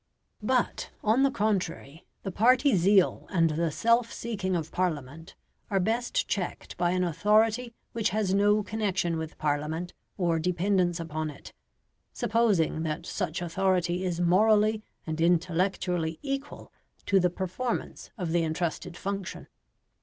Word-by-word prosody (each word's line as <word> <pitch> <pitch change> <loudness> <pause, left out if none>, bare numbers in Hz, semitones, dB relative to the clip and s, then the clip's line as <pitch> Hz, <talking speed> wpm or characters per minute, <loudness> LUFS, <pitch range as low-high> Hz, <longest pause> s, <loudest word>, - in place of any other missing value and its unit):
But, 250 +3 0
on 220 +5 +3
the 275 - +5
contrary, 185 - -2 0.2
the 195 - -3
party 255 +5 +4
zeal 190 +1 +3
and 165 -4 +2
the 165 +2 0
self 230 +8 +2
seeking 200 -5 -3
of 160 -2 -3
Parliament 160 -2 -3 0.3
are 195 - +2
best 230 +6 0
checked 185 -4 -3
by 175 0 +1
an 180 +1 +1
authority 215 +7 +2 0.2
which 225 -2 0
has 205 -1 0
no 205 +1 +3
connection 195 -6 -1
with 160 0 -6
Parliament 155 +4 -2 0.2
or 170 -3 +1
dependence 180 +1 +1
upon 155 -1 -3
it 145 - -11 0.6
supposing 205 -8 +1
that 160 +1 -3
such 175 -3 -3
authority 180 0 0
is 175 -2 -2
morally 210 +4 +4 0.2
and 160 0 -3
intellectually 175 -1 +1
equal 275 0 -5 0.3
to 195 - +4
the 180 -1 +3
performance 190 +7 -4
of 180 -5 -3
the 170 0 +2
entrusted 165 +1 -3
function. 195 -1 -5
185 Hz, 135 wpm, -28 LUFS, 165-210 Hz, 0.6 s, the